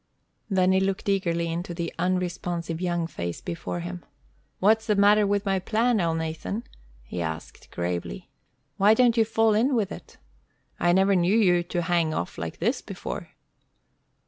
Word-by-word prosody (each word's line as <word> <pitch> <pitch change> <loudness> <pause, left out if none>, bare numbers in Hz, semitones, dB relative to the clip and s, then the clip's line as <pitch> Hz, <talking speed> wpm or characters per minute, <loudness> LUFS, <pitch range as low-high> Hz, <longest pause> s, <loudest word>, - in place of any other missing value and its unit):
Then 185 -2 +3
he 190 - +4
looked 190 +1 -1
eagerly 170 -4 0
into 175 +1 -4
the 170 -1 -4
unresponsive 175 -2 -2
young 175 -2 0
face 85 - -5
before 85 +1 -5
him. 90 +1 -6 0.5
"What's 220 +3 +3
the 210 - +3
matter 205 +1 +5
with 205 +1 0
my 195 -1 +1
plan, 225 +4 +1
Elnathan?" 165 +5 -2 0.4
he 85 +8 -5
asked, 80 -1 -6
gravely. 85 -7 -4 0.5
"Why 205 +3 +5
don't 240 -1 +4
you 225 - +5
fall 225 0 +2
in 250 +6 +2
with 215 -5 0
it? - - -10 0.6
I 175 - +3
never 190 +2 +4
knew 180 +4 +3
you 180 -5 +4
to 175 0 -3
hang 165 -2 +1
off 85 - -4
like 80 0 -5
this - - 0
before." - - -6
180 Hz, 160 wpm, -26 LUFS, 165-205 Hz, 0.6 s, matter